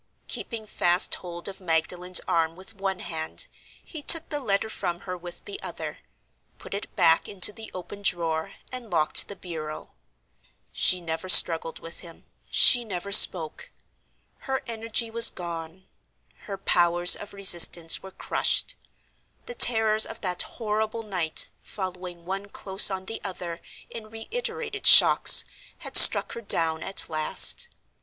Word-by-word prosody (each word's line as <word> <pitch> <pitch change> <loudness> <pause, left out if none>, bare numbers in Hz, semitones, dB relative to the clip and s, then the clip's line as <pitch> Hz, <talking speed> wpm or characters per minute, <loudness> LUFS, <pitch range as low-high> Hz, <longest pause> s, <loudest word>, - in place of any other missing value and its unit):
Keeping 225 -3 -7
fast 175 -3 +1
hold 175 -1 -7
of 195 -1 -10
Magdalen's 180 +2 0
arm 165 -1 -2
with 190 +4 -10
one 195 -2 -5
hand, 160 - -4 0.4
he 315 - -8
took 330 +2 +3
the 295 - -2
letter 220 -4 -2
from 180 -5 -4
her 185 -1 -8
with 175 0 -12
the 405 0 -9
other, - - -8 0.6
put - - -12
it 200 - -8
back 165 -1 +2
into 200 +1 +1
the 220 0 -12
open 195 +3 -10
drawer, 165 -4 -3 0.2
and 250 -3 -8
locked 155 -4 +3
the 200 - -10
bureau. 155 -5 -9 0.8
She 180 -1 +2
never 165 +2 -6
struggled 165 -2 +5
with 165 +1 -11
him, 165 -2 -15 0.2
she 245 -1 +5
never 200 -2 -8
spoke. 170 -5 +3 0.7
Her 265 0 -5
energy 230 0 -4
was 230 0 +7
gone; 170 +1 -9 0.6
her 195 - -7
powers 175 -2 +1
of 205 - -12
resistance 175 -4 +4
were 190 - -12
crushed. - - -1 0.7
The 485 - -7
terrors 220 - +3
of 225 - -11
that 180 -2 -2
horrible 220 0 -5
night, 180 -7 -1 0.2
following 180 -3 -9
one 195 +2 -6
close 195 0 +1
on 190 -1 -7
the 225 - -8
other 175 -3 -8 0.3
in 220 -2 -10
reiterated 440 - -5
shocks, - - +7 0.3
had - - -11
struck - - +8
her 235 - -9
down 165 -6 +1
at 195 - -5
last. 155 -1 +2
190 Hz, 145 wpm, -24 LUFS, 170-220 Hz, 0.8 s, struck